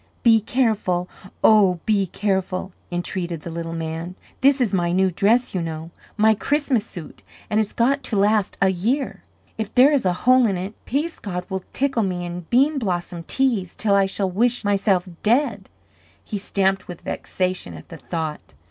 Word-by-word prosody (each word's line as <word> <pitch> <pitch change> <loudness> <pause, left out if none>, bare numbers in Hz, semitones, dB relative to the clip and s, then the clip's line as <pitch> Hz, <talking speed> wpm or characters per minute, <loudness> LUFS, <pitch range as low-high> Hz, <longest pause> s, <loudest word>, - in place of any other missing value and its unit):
"Be 225 -3 +6
careful 210 -7 0 0.4
oh, 195 -5 +5
be 200 -3 +2
careful," 190 -1 -2 0.2
entreated 175 -2 -3
the 170 - -7
little 165 0 -5
man. 165 +2 -5 0.2
"This 275 +1 +4
is 235 -5 +1
my 175 -2 +1
new 190 +1 +2
dress, 225 +8 +2
you 185 - -1
know 165 0 -5 0.3
my 220 +1 +5
Christmas 280 0 0
suit, 170 -5 -10 0.3
and 210 - +3
it's 215 -2 0
got 275 +4 +1
to 225 - -1
last 205 0 +2
a 190 - +5
year. 225 +10 -1 0.4
If 220 -1 -3
there 265 +4 +6
is 280 - +2
a 180 -2 +2
hole 255 -1 +6
in 195 -3 -1
it, 190 +4 -5
Peascod 225 - -3
will 190 -1 -3
tickle 270 -3 +1
me 180 -3 -2
and 175 -1 -7
Bean 275 +4 +3
Blossom 175 -5 -3
tease, 235 -10 0
till 210 -2 +1
I 195 -1 +4
shall 195 -1 -2
wish 235 +4 +1
myself 195 -2 +2
dead." 245 +7 +1 0.6
He 210 - -4
stamped 195 -1 0
with 175 -2 -8
vexation 185 - -3
at 80 - -12
the - - -9
thought. 160 -3 -5
195 Hz, 175 wpm, -22 LUFS, 180-230 Hz, 0.6 s, Be